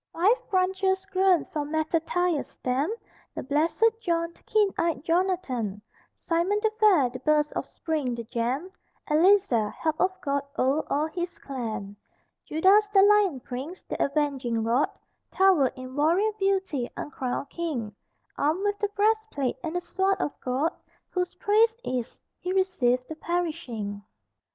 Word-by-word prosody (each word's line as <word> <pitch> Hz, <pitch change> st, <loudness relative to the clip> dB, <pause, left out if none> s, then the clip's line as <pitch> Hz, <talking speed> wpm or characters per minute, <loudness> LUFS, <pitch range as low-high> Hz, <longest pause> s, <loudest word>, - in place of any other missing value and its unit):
Five 405 Hz, +9 st, +2 dB
branches 380 Hz, 0 st, +1 dB
grown 375 Hz, -2 st, +3 dB
from 295 Hz, -2 st, -2 dB
Mattathias' 325 Hz, +1 st, 0 dB
stem, 265 Hz, +8 st, -1 dB, 0.4 s
The -, -, -4 dB
Blessed 335 Hz, -, +2 dB
John, 335 Hz, -3 st, -1 dB
the -, -, -25 dB
Keen 420 Hz, -2 st, +3 dB
Eyed 325 Hz, -5 st, -1 dB
Jonathan, 330 Hz, -, 0 dB, 0.4 s
Simon 345 Hz, +5 st, 0 dB
the 440 Hz, -, +3 dB
fair, 360 Hz, -, +5 dB
the 255 Hz, -, -7 dB
Burst 300 Hz, +2 st, +2 dB
of -, -, -3 dB
Spring, 295 Hz, -7 st, -2 dB
the 235 Hz, -, -5 dB
Gem, 245 Hz, -, -2 dB, 0.4 s
Eleazar, 310 Hz, -, +4 dB
Help 315 Hz, +6 st, -2 dB
of 370 Hz, 0 st, +1 dB
God; 280 Hz, 0 st, 0 dB, 0.2 s
o'er 275 Hz, +4 st, +2 dB
all 295 Hz, +2 st, +2 dB
his 345 Hz, +2 st, -4 dB
clan 220 Hz, -7 st, -5 dB, 0.5 s
Judas 390 Hz, +6 st, +4 dB
the 390 Hz, -1 st, +5 dB
Lion 405 Hz, -9 st, +4 dB
Prince, 270 Hz, +10 st, -7 dB
the -, -, -2 dB
Avenging 275 Hz, -6 st, 0 dB
Rod, 235 Hz, +5 st, +2 dB, 0.4 s
Towered 370 Hz, -9 st, +4 dB
in 255 Hz, 0 st, -9 dB
warrior 340 Hz, +9 st, +3 dB
beauty, 380 Hz, -10 st, 0 dB
uncrowned 270 Hz, 0 st, -4 dB
king, 275 Hz, -11 st, -3 dB, 0.5 s
Armed 315 Hz, +7 st, +1 dB
with 410 Hz, 0 st, 0 dB
the 415 Hz, -, 0 dB
breastplate 430 Hz, -, +1 dB
and 325 Hz, 0 st, -4 dB
the 355 Hz, -, 0 dB
sword 380 Hz, +2 st, 0 dB
of -, -, -1 dB
God, 265 Hz, +6 st, 0 dB, 0.4 s
Whose 360 Hz, -1 st, -2 dB
praise 445 Hz, +2 st, +3 dB
is: 250 Hz, -, -4 dB, 0.2 s
"He 360 Hz, -, -3 dB
received 260 Hz, -11 st, +1 dB
the 315 Hz, -, -6 dB
perishing." 310 Hz, -13 st, -3 dB
325 Hz, 145 wpm, -26 LUFS, 265-380 Hz, 0.5 s, fair